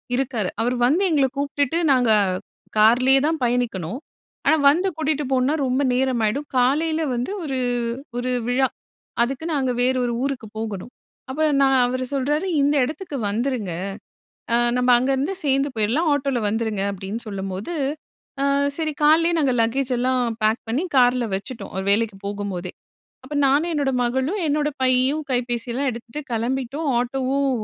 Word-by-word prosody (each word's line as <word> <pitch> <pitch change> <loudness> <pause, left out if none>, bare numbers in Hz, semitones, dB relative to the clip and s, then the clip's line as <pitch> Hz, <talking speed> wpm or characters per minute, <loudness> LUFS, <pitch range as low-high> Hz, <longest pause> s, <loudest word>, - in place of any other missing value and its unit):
இருக்காரு. 245 -7 -1
அவர் 245 +2 0
வந்து 310 +10 +3
எங்கள 280 -4 +3
கூப்ட்டுட்டு, 285 +2 0
நாங்க 250 -4 +3 0.7
கார்லயே 250 +5 +5
தான் 320 0 0
பயணிக்கணும். 235 -5 -1 0.5
ஆனா, 315 - +5
வந்து 345 +7 +2
கூட்டிட்டு 305 -2 -1
போனா 260 +3 +2
ரொம்ப 255 +2 +1
நேரமாயிடும். 255 +1 0
காலையில 310 +6 +2
வந்து 245 +8 -2
ஒரு 270 -4 -2 0.6
ஒரு 250 +1 -1 0.2
விழா. 260 +2 +2 0.6
அதுக்கு, 270 +5 -3
நாங்க 265 -3 0
வேறு 255 +1 +2
1 240 - -1
ஊருக்கு 270 -5 -3
போகணும். 220 +1 -5 0.4
அப்ப 305 +4 -1 0.2
நான் 270 -1 +4
அவரு 255 +1 -2
சொல்றாரு, 295 +6 0
"இந்த 285 +1 +3
இடத்துக்கு 305 +3 -4
வந்துருங்க. 225 -3 -2 0.8
அ - - +5 0.2
நம்ப 250 0 +1
அங்கருந்து 270 +7 0
சேர்ந்து 275 +1 +2
போயிட்லாம், 230 +10 +1
ஆட்டோவுல 275 -3 0
வந்துருங்க." 220 -2 -1
அப்பிடின்னு 200 +4 -5
சொல்லும்போது, 195 - -5 0.7
அ, - - +2 0.3
சரி 315 -2 -1
காலைலே 325 +3 +5
நாங்க 275 -4 +2
லக்கேஜ் 255 +3 0
எல்லாம் 255 +1 +1 0.2
பேக் 220 +2 +2
பண்ணி, 245 +9 0
கார்ல 250 -1 +4
வச்சுட்டோம். 230 +5 -7
அவரு 190 0 -3
வேலைக்கி 215 0 +1
போகும்போதே! 200 -3 -4 0.5
அப்ப 280 +3 -7
நானு, 285 +5 +3
என்னோட 285 -3 0
மகளும் 265 +11 -1
என்னோட 295 0 +1
பையும் 260 +4 +2
கைபேசிலாம் 245 +1 -1
எடுத்துட்டு 235 +4 -7
கிளம்பிட்டோம். 265 +6 -2
ஆட்டோவும் 270 +2 0
255 Hz, 140 wpm, -22 LUFS, 235-280 Hz, 0.8 s, கார்லயே